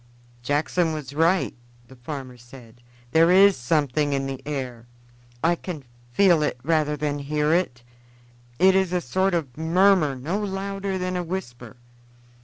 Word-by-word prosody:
"Jackson 155 +5 0
was 145 -4 -6
right," 165 +5 +2 0.3
the 130 - -15
farmer 130 0 -7
said; 120 -1 -15 0.3
"there 165 +3 +5
is 195 +2 +6
something 145 +2 0
in 135 0 -1
the 135 -1 -5
air. 125 -5 -5 0.6
I 170 +2 +4
can 170 -4 -6 0.3
feel 175 +3 +4
it 150 -4 -1
rather 150 -1 +1
than 145 -1 -2
hear 150 +2 0
it. 130 -9 -1 0.7
It 190 +5 +5
is 190 -2 +1
a 180 - +2
sort 185 +7 0
of 140 -7 -3
murmur 165 -2 +3
no 155 +11 -3
louder 195 -1 -3
than 185 0 -3
a 180 - -1
whisper. 125 - -7
155 Hz, 150 wpm, -24 LUFS, 135-180 Hz, 0.7 s, is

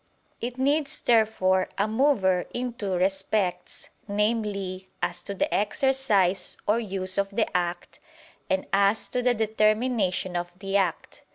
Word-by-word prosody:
It 245 +1 -5
needs 290 +3 0
therefore 210 -5 +2
a 205 - +1
mover 215 -7 +2
in 245 0 -2
two 205 -5 -3
respects, 190 +1 -1 0.2
viz. 200 -3 -1
as 175 0 -2
to 200 - -6
the - - -1
exercise 210 -5 +1
or 215 +3 +3
use 190 -3 +2
of 200 0 0
the 205 0 -2
act, 175 0 -2 0.5
and 190 0 0
as 200 +2 +3
to 250 - -1
the 245 0 +2
determination 215 -3 +1
of 175 0 -3
the 195 +1 -4
act. 190 -4 -1
200 Hz, 135 wpm, -26 LUFS, 190-230 Hz, 0.5 s, or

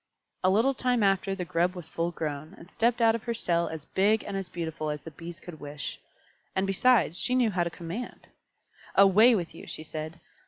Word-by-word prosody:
A 185 - +5
little 225 +8 +3
time 250 -3 +1
after 195 0 +2
the 180 -2 -4
Grub 175 +1 +1
was 175 -4 -7
full 165 +1 -1
grown, 155 0 -5
and 170 - -14
stepped 235 +1 +1
out 225 -1 +6
of 230 - -3
her 235 -1 -1
cell 170 -6 +1
as 160 -3 -5
big 210 +3 +2
and - - -5
as 195 -2 -3
beautiful 160 -3 -4
as 150 0 -3
the 165 - -8
Bees 170 +3 -9
could 170 -3 -10
wish. 145 0 -6 0.6
And 190 - +1
besides, 195 -2 +3
she 250 - +1
knew 245 -4 +3
how 180 -2 +1
to 170 - -2
commando 175 +8 -7 0.7
"Away 210 +5 +7
with 175 -5 -3
you!" - - -11
she 155 - -5
said. 155 +1 -6
180 Hz, 210 wpm, -28 LUFS, 165-215 Hz, 0.7 s, Away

